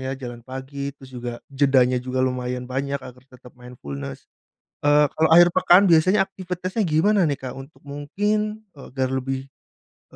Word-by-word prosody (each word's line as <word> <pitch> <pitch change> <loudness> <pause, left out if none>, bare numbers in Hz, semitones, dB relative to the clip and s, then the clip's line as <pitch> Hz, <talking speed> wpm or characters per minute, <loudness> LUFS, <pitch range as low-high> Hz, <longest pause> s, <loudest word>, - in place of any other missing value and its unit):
ya 130 +1 -4
jalan 120 -3 -8
pagi, 135 +3 -6
terus 130 -1 -15
juga 120 -1 -5 0.2
jedanya 130 -2 +3
juga 130 +1 -1
lumayan 125 -1 -3
banyak 135 +2 -2
agar 125 0 -11
tetap 125 -1 -16
mindfulness. 70 - -9 0.6
Eee, 145 0 +4
kalau 160 0 +2
akhir 175 +2 +7
pekan 185 +2 +5
biasanya 185 +3 +4
aktivitasnya 185 +1 -5
gimana 175 +3 +3
nih 145 - -1
Kak 130 - -4
untuk 135 +3 -12
mungkin, 210 +10 -2
agar 130 -2 -4
lebih 130 0 -2 0.6
lebih, - - -19
135 Hz, 155 wpm, -23 LUFS, 125-170 Hz, 0.6 s, akhir